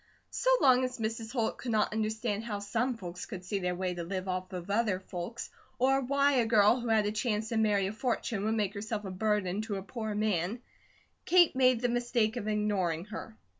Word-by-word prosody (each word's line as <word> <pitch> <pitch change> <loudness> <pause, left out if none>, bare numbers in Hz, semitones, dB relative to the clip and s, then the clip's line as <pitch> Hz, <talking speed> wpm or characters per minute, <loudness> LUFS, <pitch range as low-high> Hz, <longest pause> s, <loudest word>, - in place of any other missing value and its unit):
So - - 0
long 255 -1 +5
as 255 0 -2
Mrs. 225 0 -3
Holt 230 -4 -1
could 250 - -5
not 215 -1 +1
understand 220 0 -1
how 215 -3 -3
some 230 +5 -1
folks 180 -2 -7
could 185 -5 -7
see 200 +1 -1
their 180 -1 -1
way 185 0 -2
to 175 - -5
live 185 +2 -4
off 185 0 -3
of 180 +1 -5
other 210 -3 +1
folks, 190 +5 -6 0.3
or 270 +2 +3
why 280 +2 +2
a 235 -2 +3
girl 220 +2 +5
who 240 - -5
had 220 -2 +3
a 205 - 0
chance 215 0 -1
to 230 - -1
marry 210 -3 +3
a 195 - -3
fortune 230 -3 -2
would 220 +1 +1
make 205 -3 0
herself 210 0 -4
a 190 - -4
burden 205 0 0
to 215 -2 -4
a 195 - -4
poor 220 0 -4
man, 210 +2 -1 0.6
Kate 350 -5 +5
made 255 -2 +4
the 245 - +2
mistake 240 -2 +1
of 215 -4 -4
ignoring 200 -6 0
her. 220 +1 -8
215 Hz, 215 wpm, -30 LUFS, 195-235 Hz, 0.6 s, long